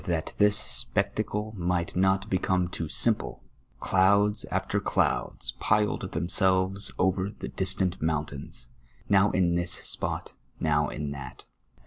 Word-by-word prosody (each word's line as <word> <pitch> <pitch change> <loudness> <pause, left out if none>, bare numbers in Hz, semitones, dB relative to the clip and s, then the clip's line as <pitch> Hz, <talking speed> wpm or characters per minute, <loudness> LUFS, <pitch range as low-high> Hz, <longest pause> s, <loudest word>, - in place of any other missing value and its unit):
403 85 - 0 0.2
that - - -27
this 105 0 +6
spectacle 105 - -1
mi*:;lit 90 -2 -2
not 95 +2 +2
become 95 -2 0
too 85 -3 -5
simple, - - 0 0.4
clouds 100 +3 +3
after - - -1
clouds - - -1
piled 105 0 +1
theuiselves 95 +3 +2
over 95 +1 +1
the 100 - -8
distant 95 -1 +1
mountains, 75 -5 -3 0.4
now 100 0 +4
in 90 -3 +1
tliis 85 0 0
spot, - - -3 0.3
now 75 -2 +1
in 75 0 -5
tliat. 70 -2 -8
95 Hz, 125 wpm, -27 LUFS, 85-95 Hz, 0.4 s, this